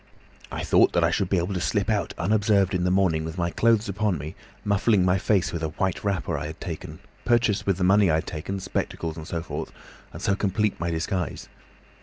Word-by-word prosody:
I - - -4
thought - - +4
that 85 - +3
I 85 - +3
should 95 +1 0
be 95 - +2
able 90 +3 -1
to 90 - -2
slip 100 +4 0
out 105 -6 -1
unobserved 100 0 +2
in 90 -1 0
the - - +2
morning 90 -4 +2
with 80 +2 -6
my 85 -1 0
clothes 115 +1 +2
upon 100 -2 0
me, 75 +3 -6 0.3
muffling 100 -1 +3
my 90 +1 +3
face 95 -2 +1
with 85 - -3
a 80 - 0
white 90 +4 -2
wrapper 95 -6 -1
I 75 - -4
had 80 - -9
taken, - - -6 0.3
purchase, 120 -4 +2
with 95 -3 +2
the 95 - -1
money 100 +1 +5
I 80 - +3
had 80 - -1
taken, 90 +5 -4
spectacles 85 -3 -3
and 80 -1 -8
so 85 -1 -3
forth, - - -5 0.4
and - - -9
so 100 - +1
complete 105 0 0
my 85 +1 -1
disguise. 85 0 -3
95 Hz, 225 wpm, -25 LUFS, 85-100 Hz, 0.4 s, money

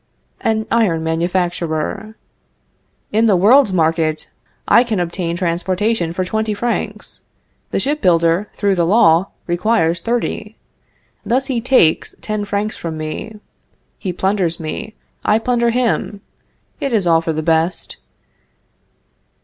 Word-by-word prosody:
"An 220 -1 0
Iron 190 -9 +2
Manufacturer. 175 +3 -2 1.0
In 220 +2 +3
the 205 - +4
world's 215 +6 +5
market 160 -2 0 0.4
I 235 - +6
can 225 -6 -2
obtain 170 -1 -2
transportation 180 +2 0
for 185 +2 -2
twenty 220 +2 -1
francs. 235 +3 -3 0.5
The - - -1
ship 295 +2 -1
builder, 170 +2 +2
through 200 -1 +1
the 175 -3 +1
law, 180 -3 +4 0.2
requires 175 -2 +1
thirty. 230 -1 -3 0.7
Thus 260 +3 0
he 255 -4 -2
takes 225 -10 +3
ten 215 -1 -3
francs 205 +1 -2
from 165 -2 -5
me. 155 +8 -6 0.6
He 185 - -3
plunders 185 -2 0
me; 215 +7 -6 0.3
I 215 0 +3
plunder 235 0 +1
him. 235 -4 -1 0.6
It 275 -4 -2
is 205 -5 +2
all 165 -1 +4
for 165 - -2
the 155 0 -3
best. 165 +2 0
190 Hz, 125 wpm, -18 LUFS, 170-220 Hz, 1.0 s, I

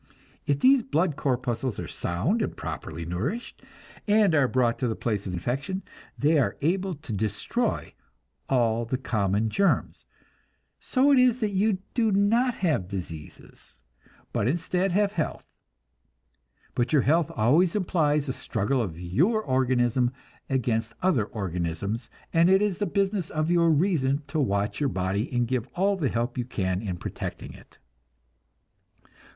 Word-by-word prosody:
If 140 -1 +1
these 265 0 +6
blood 175 - 0
corpuscles 125 -4 -1
are - - -4
sound 140 - -1
and - - -3
properly 80 +1 -6
nourished, 120 - -4 0.5
and 205 -4 +4
are 145 -4 +4
brought 125 -2 +1
to 125 - 0
the 110 - -1
place 105 -4 -2
of 90 - -4
infection, 140 - -3 0.3
they 150 +2 +3
are 135 - 0
able 185 +4 0
to 140 -6 -8
destroy 105 -1 -2 0.6
all 120 -3 +2
the 120 +3 -2
common 105 -3 0
germs; 200 - +1 0.7
so 275 +2 +2
it 275 - +6
is 250 -1 +4
that 215 -2 0
you 195 -1 +1
do 225 -3 +2
not 230 +5 +3
have 145 - +1
diseases, 80 -8 -9 0.5
but 105 - +1
instead 180 +6 0
have 200 +2 +2
health. 165 -7 -3 1.3
But 120 +1 0
your 145 - +5
health 160 +2 +2
always 155 - +3
implies 155 -7 +1
a 130 - -1
struggle 125 +4 -1
of 85 -7 -4
your 165 - +1
organism 125 - +2 0.4
against 115 -4 0
other 155 - +3
organisms, 100 +3 -3 0.2
and 165 +2 +5
it 190 +2 +5
is 205 -2 -1
the 205 - 0
business 195 -3 0
of 155 +2 -1
your 170 -1 +4
reason 150 -4 +2
to 155 +2 -1
watch 100 -6 0
your 145 -2 +1
body 95 +3 -2
and 120 -1 +1
give 125 -2 -1
all 200 +2 +2
the 155 -9 0
help 120 +2 -2
you 120 - -1
can 95 -6 -2
in 95 -5 -4
protecting - - -6
it. - - -17
135 Hz, 150 wpm, -26 LUFS, 110-185 Hz, 1.3 s, these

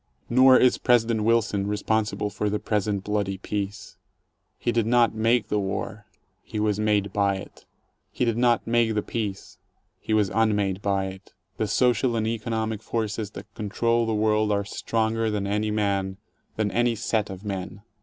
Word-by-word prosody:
Nor 130 +1 +7
is 125 - +4
President 115 -2 +3
Wilson 110 -3 +2
responsible 105 0 -1
for 105 - -1
the 105 - 0
present 105 -2 -1
bloody 100 -2 -1
peace. 100 +1 -5 0.6
He 120 - -1
did 115 -2 +1
not 120 -1 +4
make 115 +1 +2
the 105 - +1
war: 100 +2 -4 0.3
he 110 - -6
was 105 -1 +1
made 105 -2 +1
by 100 -1 +2
it. 95 - -10 0.5
He - - 0
did 115 -2 +1
not 120 -1 +2
make 115 -1 +2
the 105 - 0
peace: 105 -4 -5 0.4
he 110 - -1
was 105 -3 +2
unmade 105 -4 +1
by 100 -1 0
it. 95 +1 -9 0.2
The 110 - 0
social 120 +2 +2
and 110 -1 0
economic 110 -1 -2
forces 110 -2 -3
that - - -10
control 115 +3 0
the 110 - 0
world 105 0 +2
are 100 -1 0
stronger 110 +1 -1
than 105 -2 -2
any 105 +2 0
man, 100 -3 -1 0.4
than 105 -2 0
any 120 +1 +2
set 110 -1 -1
of 95 +2 -8
men. 100 0 -5
105 Hz, 170 wpm, -25 LUFS, 100-115 Hz, 0.6 s, Nor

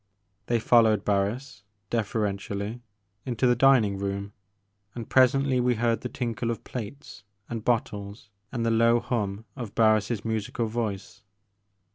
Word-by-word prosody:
They 120 -1 +2
followed 110 -3 +4
Barris, 105 +4 -1 0.3
deferentially, 105 0 -2 0.4
into 125 -1 -1
the 125 -1 +4
dining 120 -6 +4
room, 100 +1 -3 0.6
and 115 -2 -6
presently 130 0 +3
we 125 0 +2
heard 115 0 +1
the 125 - -4
tinkle 120 -2 -3
of 115 - -3
plates 120 -1 -8 0.2
and 115 -2 -5
bottles 105 -3 -2 0.2
and 120 -3 -2
the 115 - +2
low 115 +1 +4
hum 105 -3 -3
of 120 -7 -7
Barris* 110 -1 +2
musical 110 +1 -2
voice. 110 -2 -4
115 Hz, 130 wpm, -26 LUFS, 105-120 Hz, 0.6 s, followed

